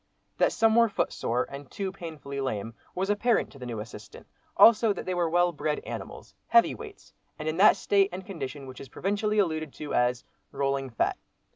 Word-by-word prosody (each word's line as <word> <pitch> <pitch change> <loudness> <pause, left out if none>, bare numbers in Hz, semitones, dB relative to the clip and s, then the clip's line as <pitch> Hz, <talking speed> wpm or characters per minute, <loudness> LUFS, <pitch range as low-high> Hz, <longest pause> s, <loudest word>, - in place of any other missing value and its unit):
That - - +4
some 225 -1 +3
were 230 -1 +5
footsore, 125 - -1
and 140 0 -8
two 195 -3 -4
painfully 155 -6 -7
lame, 115 -4 -3 0.2
was 190 +2 0
apparent 225 +3 +1
to 140 - -14
the 125 - -7
new 115 -3 -4
assistant, 110 +1 -10 0.3
also 225 -1 +7
that - - -7
they 185 - -1
were 175 -2 +1
well 175 +1 +3
bred 150 -1 -2
animals, - - -8
heavy 350 - +5
weights, 430 -3 -11 0.2
and 155 - -5
in 155 +1 -1
that 200 +3 +7
state 200 -1 +3
and 185 +1 -7
condition 145 -7 -6
which 130 -1 -10
is 135 - -10
provincially 210 +2 -1
alluded 160 -6 0
to 150 - -6
as 125 0 +1 0.3
"rolling 135 -1 -1
fat." 115 - -1
165 Hz, 190 wpm, -28 LUFS, 135-200 Hz, 0.3 s, also